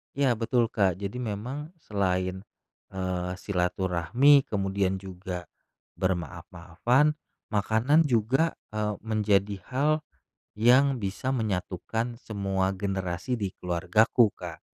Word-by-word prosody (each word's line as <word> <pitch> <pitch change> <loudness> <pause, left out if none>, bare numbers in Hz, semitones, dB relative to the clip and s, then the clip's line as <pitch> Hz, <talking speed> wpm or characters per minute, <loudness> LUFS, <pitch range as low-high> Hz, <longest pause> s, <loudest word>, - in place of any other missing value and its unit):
Iya, 140 -2 +3
betul 115 0 +1
Kak. 95 -5 +2
Jadi 100 +5 -5
memang 125 - -5
selain, 95 -2 -1 0.5
eee, 90 -1 -3
silaturahmi, 95 - +2
kemudian 95 -1 0
juga 95 -2 -6 0.6
bermaaf-maafan, 90 - 0 0.4
makanan 115 +9 +3
juga, 125 +7 +2 0.2
eee, 105 -1 -1
menjadi 105 -2 +1
hal 140 +4 +1 0.6
yang 125 +4 +4
bisa 100 +6 -2
menyatukan 115 +1 -2
semua 95 -3 -1
generasi 95 +4 -2
di 100 -3 -3
keluargaku, 90 +7 +3
Kak. 85 -3 -8
100 Hz, 100 wpm, -27 LUFS, 95-120 Hz, 0.6 s, yang